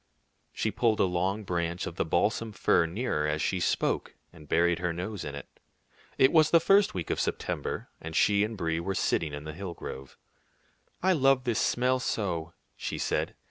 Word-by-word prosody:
She 110 - -1
pulled 110 +1 +1
a - - +5
long 95 +3 0
branch 85 -2 -2
of - - -6
the - - -1
balsam 105 +7 0
fir 85 -3 +3
nearer 85 -5 -1
as 75 +1 -1
she 90 +3 0
spoke, - - 0 0.2
and 75 -3 -15
buried 85 +1 +3
her 90 -1 -1
nose 90 +4 -5
in 70 - -5
it. 70 - -11 0.6
It 130 - +5
was 155 -2 +5
the 170 - +6
first 195 - +4
week 85 -4 -3
of - - -1
September, - - -2
and 80 0 -7
she 100 +2 +4
and 110 +1 -3
Brie 80 -2 -1
were 95 +3 -3
sitting 80 -3 0
in 75 0 -6
the 75 0 -6
hill 90 0 -6
grove. 65 -3 -8 0.9
"I 190 0 +4
love 135 -4 +3
this 120 -3 0
smell 125 +1 +2
so," 85 -9 -2 0.2
she - - -4
said. - - -1
90 Hz, 190 wpm, -28 LUFS, 80-115 Hz, 0.9 s, the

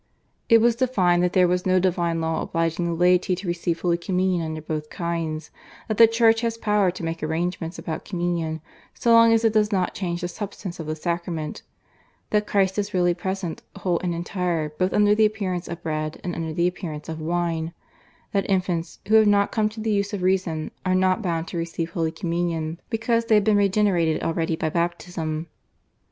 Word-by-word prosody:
It 230 -2 +7
was 235 0 +4
defined 195 -9 +2
that 180 0 +1
there 180 -1 +5
was 180 +1 0
no 185 0 +4
divine 170 -2 0
law 160 0 -1
obliging 165 +1 -1
the 170 - -1
laity 180 +2 +3
to 185 +1 -7
receive 170 -1 -1
Holy 170 -1 +1
Communion 180 0 0
under 160 0 -4
both 155 -1 -4
kinds, 165 -3 -3 0.4
that 215 - -2
the 230 - +9
Church 225 0 +3
has 230 -1 -1
power 210 -4 +2
to 175 0 -6
make 165 0 -3
arrangements 165 +2 -2
about 160 -2 -5
Communion 170 -4 -2 0.3
so 235 - +1
long 230 0 +7
as 225 0 +3
it 220 - +3
does 210 -1 +2
not 185 -3 0
change 175 -2 -3
the 175 - -1
substance 190 -2 -7
of 160 - -5
the 155 - -2
sacrament, 170 -1 -3 0.7
that 210 0 +1
Christ 195 0 +1
is 205 -1 -3
really 175 -1 +3
present 190 -1 -4
whole 175 -3 0
and 175 -2 -2
entire 170 -2 -2
both 185 +5 -1
under 210 0 +4
the 215 0 +5
appearance 190 -5 -3
of 170 0 -7
bread 155 -1 -3
and 175 - -3
under 165 -1 -3
the 170 +2 +1
appearance 160 -4 -5
of 160 -1 -5
wine, 165 0 -1 0.6
that 200 0 0
infants, 180 -3 -1
who 215 - 0
have 220 -1 +7
not 200 0 +3
come 215 -1 +1
to 220 +1 -10
the 220 0 -1
use 200 0 0
of 195 -3 -3
reason, 180 -4 0
are 185 0 +1
not 185 +2 +2
bound 170 -4 -2
to 175 - -5
receive 165 0 -3
Holy 165 -2 -1
Communion 170 -2 -2
because 230 0 0
they 225 - +4
have 210 - +4
been 215 0 +3
regenerated 195 -5 +2
already 165 0 0
by 160 0 -1
baptism. 170 -2 -2
180 Hz, 200 wpm, -24 LUFS, 165-200 Hz, 0.7 s, the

